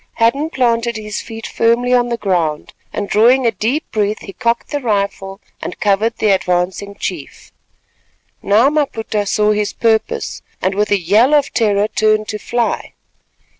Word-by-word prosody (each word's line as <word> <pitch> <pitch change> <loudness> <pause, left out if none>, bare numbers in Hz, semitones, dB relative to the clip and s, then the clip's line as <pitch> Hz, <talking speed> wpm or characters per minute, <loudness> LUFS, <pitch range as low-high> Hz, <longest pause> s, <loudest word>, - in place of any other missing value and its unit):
Hadden 275 +7 +1
planted 235 -4 0
his 210 -1 -5
feet 225 -1 -9
firmly 235 +2 +1
on 245 -1 +3
the 235 - -1
ground 170 -8 -1 0.2
and 205 - -3
drawing 240 +6 +4
a 230 - +3
deep 225 - -2
breath, 210 0 -1
he 195 - -9
cocked 235 +1 -1
the 290 - -1
rifle 200 -4 -2 0.2
and - - -6
covered 215 +3 +1
the 215 -2 +2
advancing 185 +2 -1
chief. 175 -7 -6 0.9
Now 225 +8 +3
Maputa 225 -8 -1
saw 210 +1 +2
his 210 -1 -1
purpose 225 -1 0 0.2
and 185 - 0
with 210 +2 0
a 205 - +3
yell 210 - +3
of 285 -2 +1
terror 210 -2 +2
turned 215 0 +1
to 210 - -4
fly. 235 +1 -2
215 Hz, 160 wpm, -17 LUFS, 200-235 Hz, 0.9 s, drawing